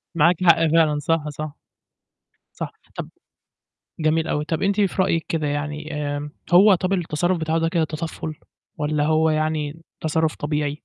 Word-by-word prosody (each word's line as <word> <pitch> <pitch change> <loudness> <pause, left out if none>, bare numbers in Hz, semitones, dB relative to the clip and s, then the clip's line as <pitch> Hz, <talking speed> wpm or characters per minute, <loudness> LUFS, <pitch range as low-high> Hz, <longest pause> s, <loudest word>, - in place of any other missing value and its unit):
معاكِ 170 +3 +3
حق 165 -2 +5
فعلًا 155 -2 +3
صح، 155 +1 0
صح. 150 0 -6 1.0
صح، - - -4 0.2
طَب - - -5 0.9
جميل 160 +1 +1
أوي، 150 - 0
طَب 160 0 -2
أنتِ 200 +1 +2
في 195 -1 +2
رأيك 165 -4 0
كده 160 -2 -1
يعني 150 +2 -3
آآ، 145 0 -3 0.2
هو 195 +3 +8
طَب 185 +1 -1
التصرُّف 175 0 0
بتاعه 160 0 0
ده 165 0 +1
كده 165 -1 +1
تطفُّل 155 0 -5 0.4
والَّا 150 0 0
هو 160 +1 +3
يعني 155 0 -1 0.2
تصرُّف 160 0 0
طبيعي؟ 150 0 -1
160 Hz, 155 wpm, -23 LUFS, 150-165 Hz, 1.0 s, هو